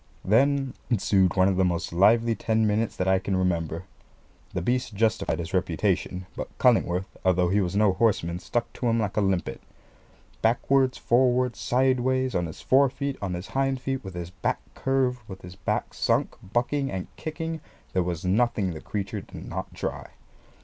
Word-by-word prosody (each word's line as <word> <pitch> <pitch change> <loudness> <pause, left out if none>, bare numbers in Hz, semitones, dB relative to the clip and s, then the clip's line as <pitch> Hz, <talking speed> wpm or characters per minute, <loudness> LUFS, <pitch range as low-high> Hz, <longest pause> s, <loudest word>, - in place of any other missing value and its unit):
Then 135 +5 +3 0.2
ensued 95 -5 +2
one 95 -1 +4
of 95 -2 +1
the 95 - +4
most 85 -2 -1
lively 115 +6 +4
ten 110 +1 +1
minutes 105 +1 0
that 90 - -1
I 95 0 +4
can 95 0 -2
remember. 85 -2 -1 0.7
The 90 - -2
beast 125 0 -1
justified 110 +2 +1
his - - -5
reputation; 90 0 0
but - - -5
Cullingworth, 95 -7 +3 0.2
although 90 -1 +3
he 100 +3 +3
was 90 0 -2
no 105 -2 +4
horseman, 90 -5 +1
stuck 120 +4 -2
to 125 - -2
him 115 0 +2
like 105 -3 -1
a 105 - +2
limpet. 95 -3 -1 0.8
Backwards, 130 +3 +2
forwards, 125 -2 +2
sideways, 130 0 +1
on 90 -1 0
his 80 - -9
fore 135 +1 +4
feet, 140 +1 -3
on 95 -3 -2
his 90 +3 -7
hind 135 -1 0
feet, 135 +1 -3
with 95 -2 -8
his 85 0 -5
back 90 - -2
curved, 130 -2 0
with 95 -3 -10
his 90 +1 -10
back - - -2
sunk, - - +1
bucking 125 +7 -1
and 95 -1 -3
kicking, 160 0 -4 0.3
there 95 - +2
was 85 -1 -3
nothing 100 -1 +2
the 80 - -8
creature 100 -2 -4
did - - -10
not - - -5
try. - - -4
105 Hz, 175 wpm, -26 LUFS, 95-125 Hz, 0.8 s, one